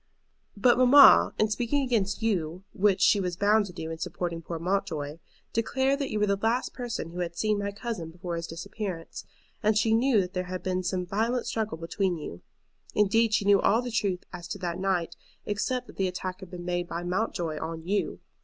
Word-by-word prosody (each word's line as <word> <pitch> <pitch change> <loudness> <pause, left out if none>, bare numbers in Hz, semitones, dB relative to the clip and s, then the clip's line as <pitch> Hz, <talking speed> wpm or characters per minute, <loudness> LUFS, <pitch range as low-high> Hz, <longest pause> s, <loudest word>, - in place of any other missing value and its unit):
"But 240 +4 +4
mamma, 265 +2 +8
in 215 0 +2
speaking 245 +5 0
against 220 -4 0
you, 180 -5 -1
which 195 -1 +2
she 210 - +5
was 180 -2 -2
bound 205 +1 +3
to - - -9
do 160 -2 -6
in 160 - -6
supporting 170 0 -3
poor 165 +1 -5
Mountjoy, 160 -4 -2 0.3
declared 265 +5 +1
that 280 - -2
you 215 - -1
were 210 - +3
the 200 -1 +1
last 225 +5 0
person 240 -9 -4
who 175 - -7
had 170 -1 -3
seen 215 +1 +1
my 200 0 -2
cousin 205 -6 -5
before 175 +1 -5
his 165 0 -4
disappearance, 180 0 -6 0.4
and 215 -1 +3
she 220 0 +3
knew 235 0 +4
that 180 -1 -2
there 185 0 -2
had 185 0 -5
been 185 0 0
some 180 0 -2
violent 225 +6 0
struggle 220 -6 -2
between 175 +2 -1
you. 90 - -8 0.5
Indeed, 215 +2 +3
she 205 - 0
knew 200 -1 +5
all 225 +4 +3
the 245 - -4
truth 200 -5 0
as 175 -1 -7
to - - -5
that 175 -2 -3
night, 185 -3 0 0.3
except 245 +5 -1
that - - -15
the 190 - +1
attack 185 0 -4
had 190 -3 -10
been 175 -1 -8
made 175 0 -1
by 170 +1 -4
Mountjoy 175 -4 -2
on 160 0 -5
you. 200 +3 -1
195 Hz, 210 wpm, -28 LUFS, 175-220 Hz, 0.5 s, mamma